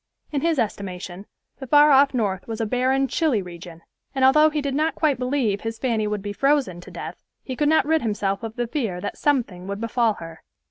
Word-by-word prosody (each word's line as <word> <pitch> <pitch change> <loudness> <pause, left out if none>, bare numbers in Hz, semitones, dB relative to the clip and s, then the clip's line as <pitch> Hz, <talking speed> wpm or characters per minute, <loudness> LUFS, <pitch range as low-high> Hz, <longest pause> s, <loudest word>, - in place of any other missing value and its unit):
In 285 -3 -1
his 330 0 +1
estimation 195 -4 -4 0.3
the 265 - -7
far 295 +3 +6
off 275 0 +6
North 200 -6 -1
was 225 -1 -5
a 225 - 0
barren, 260 +4 +1
chilly 265 - +1
region, 170 -1 -11 0.3
and 265 -1 +3
although 305 +4 +6
he 305 0 -2
did 280 -2 -2
not 310 +3 0
quite 295 -5 +1
believe 250 -6 0
his 225 0 -4
Fanny 225 -3 0
would 210 -2 -3
be 205 0 -4
frozen 275 - +1
to - - -12
death, - - -8 0.2
he 260 - -5
could 295 +3 +1
not 315 -3 +4
rid 320 +1 +2
himself 205 -3 -1
of 225 -1 -6
the 240 - -1
fear 230 -8 -3
that 205 - -5
something 230 -11 0
would 200 +1 -4
befall 230 0 +1
her. 165 -1 -10
235 Hz, 220 wpm, -23 LUFS, 200-280 Hz, 0.3 s, far